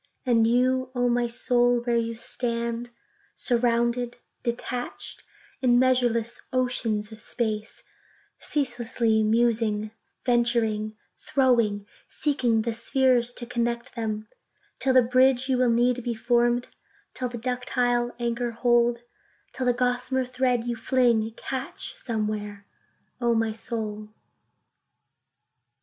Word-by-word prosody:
And 230 Hz, -3 st, +4 dB
you, 255 Hz, +2 st, +2 dB
O 245 Hz, 0 st, +2 dB
my 240 Hz, 0 st, +2 dB
Soul, 245 Hz, 0 st, +2 dB
where 240 Hz, 0 st, 0 dB
you 230 Hz, 0 st, 0 dB
stand, 235 Hz, 0 st, -2 dB, 0.5 s
Surrounded, 240 Hz, 0 st, +1 dB, 0.3 s
surrounded, 245 Hz, +1 st, -4 dB, 0.4 s
in 245 Hz, -2 st, +4 dB
measureless 245 Hz, -3 st, +2 dB
oceans 230 Hz, -4 st, 0 dB
of 220 Hz, -, -9 dB
space, 215 Hz, -1 st, -3 dB, 0.6 s
Ceaselessly 240 Hz, -5 st, 0 dB
musing, 220 Hz, -1 st, +1 dB, 0.3 s
venturing, 230 Hz, -3 st, +1 dB, 0.2 s
throwing,—seeking 235 Hz, 0 st, 0 dB
the 235 Hz, 0 st, -1 dB
spheres, 245 Hz, +1 st, +2 dB
to 240 Hz, -, -4 dB
connect 235 Hz, -1 st, -2 dB
them; 215 Hz, -2 st, -3 dB, 0.5 s
Till 260 Hz, -1 st, +2 dB
the 255 Hz, -, +7 dB
bridge 255 Hz, +1 st, +3 dB
you 260 Hz, -2 st, +1 dB
will 250 Hz, -1 st, +4 dB
need, 245 Hz, +1 st, +2 dB
be 235 Hz, -1 st, -2 dB
form'd—till 240 Hz, +2 st, -1 dB
the 240 Hz, -, -6 dB
ductile 245 Hz, 0 st, 0 dB
anchor 240 Hz, 0 st, -1 dB
hold; 235 Hz, 0 st, +2 dB, 0.5 s
Till 255 Hz, -, -2 dB
the 245 Hz, -, +4 dB
gossamer 250 Hz, +1 st, 0 dB
thread 250 Hz, -1 st, 0 dB
you 240 Hz, 0 st, -2 dB
fling, 235 Hz, -2 st, +2 dB
catch 265 Hz, 0 st, -4 dB
somewhere, 210 Hz, -3 st, -4 dB, 0.6 s
O 235 Hz, -1 st, +2 dB
my 225 Hz, 0 st, +1 dB
Soul. 215 Hz, -1 st, -4 dB
240 Hz, 110 wpm, -26 LUFS, 230-250 Hz, 0.6 s, the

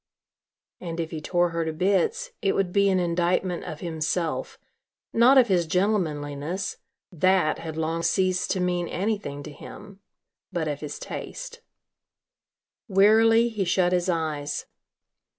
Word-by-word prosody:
And 170 Hz, -1 st, -6 dB
if 165 Hz, -1 st, -3 dB
he 155 Hz, -, -5 dB
tore 175 Hz, +2 st, +1 dB
her 165 Hz, 0 st, -2 dB
to 160 Hz, -, -2 dB
bits, 315 Hz, -, 0 dB
it 195 Hz, -, +1 dB
would 185 Hz, -2 st, 0 dB
be 200 Hz, -1 st, +4 dB
an 190 Hz, -1 st, +2 dB
indictment 175 Hz, +1 st, 0 dB
of 150 Hz, -, -7 dB
himself, 160 Hz, 0 st, -2 dB, 0.6 s
not 245 Hz, +4 st, +6 dB
of 255 Hz, -2 st, +6 dB
his 175 Hz, -4 st, +2 dB
gentlemanliness, 170 Hz, -3 st, -1 dB, 0.3 s
that 185 Hz, -1 st, +2 dB
had 160 Hz, -1 st, -6 dB
long 160 Hz, +1 st, -1 dB
ceased 185 Hz, +1 st, +1 dB
to 190 Hz, -, 0 dB
mean 180 Hz, -1 st, 0 dB
anything 195 Hz, -8 st, -3 dB
to 150 Hz, -, -8 dB
him 200 Hz, +6 st, -12 dB, 0.5 s
but 170 Hz, -4 st, -2 dB
of 145 Hz, -1 st, -3 dB
his 150 Hz, -1 st, -6 dB
taste. -, -, -7 dB, 1.3 s
Wearily, 225 Hz, +3 st, +5 dB
he 215 Hz, -4 st, -2 dB
shut 180 Hz, 0 st, +2 dB
his 180 Hz, 0 st, +1 dB
eyes. 155 Hz, -4 st, -2 dB
180 Hz, 140 wpm, -25 LUFS, 160-200 Hz, 1.3 s, not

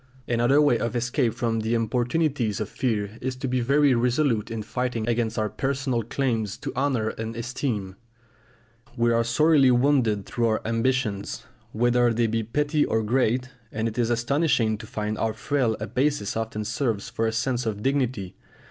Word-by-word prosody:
Another 120 Hz, +4 st, +3 dB
way 145 Hz, -6 st, +4 dB
of 115 Hz, +1 st, -2 dB
escape 120 Hz, 0 st, 0 dB
from 115 Hz, -1 st, -1 dB
the 110 Hz, +2 st, 0 dB
importunities 120 Hz, 0 st, 0 dB
of 105 Hz, -, -2 dB
fear 110 Hz, -3 st, -2 dB
is 130 Hz, 0 st, -2 dB
to 130 Hz, +1 st, -4 dB
be 130 Hz, 0 st, 0 dB
very 140 Hz, +2 st, +4 dB
resolute 120 Hz, -1 st, +1 dB
in 115 Hz, -1 st, -4 dB
fighting 120 Hz, 0 st, -2 dB
against 115 Hz, -1 st, 0 dB
our 110 Hz, 0 st, +1 dB
personal 130 Hz, +2 st, -1 dB
claims 115 Hz, -3 st, -1 dB
to -, -, -6 dB
honour 130 Hz, -5 st, 0 dB
and 110 Hz, +1 st, -5 dB
esteem. 115 Hz, -5 st, -3 dB, 1.0 s
We 120 Hz, 0 st, +3 dB
are 115 Hz, 0 st, +3 dB
sorely 140 Hz, +3 st, +4 dB
wounded 120 Hz, -6 st, +2 dB
through 120 Hz, -1 st, 0 dB
our 110 Hz, -1 st, 0 dB
ambitions, 115 Hz, -3 st, -1 dB, 0.3 s
whether 120 Hz, +1 st, +3 dB
they 120 Hz, +1 st, +2 dB
be 115 Hz, 0 st, 0 dB
petty 145 Hz, +7 st, 0 dB
or 110 Hz, 0 st, 0 dB
great; 125 Hz, +2 st, +1 dB, 0.2 s
and 110 Hz, +1 st, -1 dB
it 115 Hz, +2 st, -4 dB
is 120 Hz, -1 st, +2 dB
astonishing 120 Hz, -2 st, +1 dB
to 110 Hz, -, -9 dB
find 105 Hz, 0 st, -3 dB
how 110 Hz, -1 st, 0 dB
frail 120 Hz, 0 st, 0 dB
a 105 Hz, -, -3 dB
basis 135 Hz, -3 st, 0 dB
often 110 Hz, -1 st, -3 dB
serves 115 Hz, -2 st, -1 dB
for 115 Hz, -1 st, -1 dB
a -, -, 0 dB
sense 120 Hz, +1 st, -1 dB
of 105 Hz, -1 st, -3 dB
dignity. 130 Hz, -8 st, -1 dB
120 Hz, 175 wpm, -25 LUFS, 110-130 Hz, 1.0 s, way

